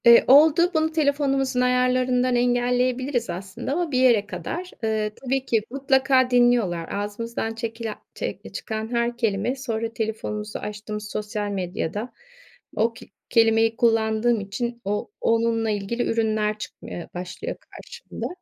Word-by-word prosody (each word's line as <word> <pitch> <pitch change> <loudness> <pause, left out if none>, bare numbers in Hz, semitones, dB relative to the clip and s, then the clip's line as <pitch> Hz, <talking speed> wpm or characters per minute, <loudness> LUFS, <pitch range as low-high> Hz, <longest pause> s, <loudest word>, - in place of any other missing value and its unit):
Eee, 235 0 +9
oldu. 315 +6 +6
Bunu 315 -1 +2
telefonumuzun 280 -4 +1
ayarlarından 250 0 +2
engelleyebiliriz 245 0 +1
aslında 190 +8 -5
ama 340 0 -1
bir 255 - +2
yere 240 -5 +5
kadar. 360 - -5
Iıı, 215 -1 0
tabii 270 0 -2
ki 225 -4 +2
mutlaka 265 -1 +3
dinliyorlar. 240 -9 +3
Ağzımızdan 225 +3 -3
çekilen 225 -1 -4 0.2
çe - - -4
eee, - - -10
çıkan 220 0 -5
her 235 0 0
kelime 225 +1 0
sonra 230 -4 -3
telefonumuzu 215 -2 -3
açtığımız 210 0 -6
sosyal 210 0 -3
medyada 200 +4 -3 0.6
o 230 +1 +2
k - - -12 0.2
kelimeyi 225 -1 +4
kullandığım 225 0 +2
için 235 +4 -4
o 205 - -2
onunla 230 0 +2
ilgili 210 +3 -1
ürünler 215 -2 0
çıkmaya 175 -4 -8
başlıyor 185 - -5 0.2
karşımda. - - -7
230 Hz, 130 wpm, -24 LUFS, 215-255 Hz, 0.6 s, Eee